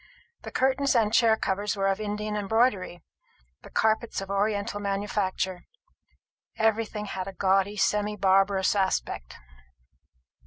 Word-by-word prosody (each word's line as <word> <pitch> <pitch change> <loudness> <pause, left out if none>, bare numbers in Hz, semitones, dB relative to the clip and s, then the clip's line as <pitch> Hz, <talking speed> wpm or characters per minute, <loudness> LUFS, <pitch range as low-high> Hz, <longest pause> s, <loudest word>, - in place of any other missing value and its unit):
The - - -7
curtains 265 +1 +1
and 220 -2 +2
chair 225 -1 +4
covers 205 +1 -1
were 195 -1 -1
of 195 +1 0
Indian 210 0 -3
embroidery; 205 -4 0 0.6
the - - -13
carpets 220 +1 0
of 195 0 -6
oriental 205 +1 -1
manufacture. 195 -2 -2 0.9
Everything 220 -1 0
had 190 -2 -5
a 195 - -6
gaudy 195 +2 +1
semi 210 +1 +1
barbarous 195 0 +3
aspect. 190 - -1
205 Hz, 120 wpm, -27 LUFS, 195-220 Hz, 0.9 s, chair